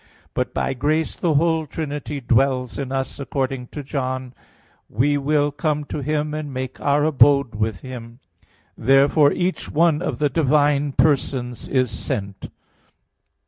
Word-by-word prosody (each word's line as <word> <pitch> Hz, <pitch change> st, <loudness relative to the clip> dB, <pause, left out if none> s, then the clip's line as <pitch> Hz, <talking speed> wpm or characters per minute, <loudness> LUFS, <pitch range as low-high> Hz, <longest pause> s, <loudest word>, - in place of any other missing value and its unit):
But -, -, -1 dB
by -, -, -1 dB
grace 150 Hz, +5 st, 0 dB
the 165 Hz, -4 st, 0 dB
whole 160 Hz, +1 st, +2 dB
Trinity 145 Hz, -1 st, -4 dB
dwells 125 Hz, +1 st, +1 dB
in 135 Hz, -2 st, -4 dB
us 135 Hz, +1 st, -3 dB
according 135 Hz, -2 st, -3 dB
to 145 Hz, -, -7 dB
John 130 Hz, -2 st, -3 dB, 0.6 s
14:23: -, -, -19 dB
"We 145 Hz, +3 st, +3 dB
will 145 Hz, +1 st, +1 dB
come 150 Hz, +1 st, -1 dB
to 145 Hz, 0 st, -5 dB
him 150 Hz, +1 st, -1 dB
and 155 Hz, -2 st, -4 dB
make 130 Hz, 0 st, -5 dB
Our 145 Hz, +1 st, +2 dB
abode 140 Hz, -4 st, +4 dB
with 105 Hz, -2 st, -2 dB
him." 120 Hz, -3 st, -9 dB, 0.6 s
Therefore 140 Hz, +3 st, +4 dB
each 180 Hz, +1 st, -2 dB
one 165 Hz, 0 st, +2 dB
of 180 Hz, -, -2 dB
the 150 Hz, -1 st, +1 dB
divine 145 Hz, -1 st, +2 dB
persons 130 Hz, -5 st, 0 dB
is 130 Hz, -3 st, +1 dB
sent. 100 Hz, -2 st, -5 dB
140 Hz, 145 wpm, -22 LUFS, 130-150 Hz, 0.6 s, abode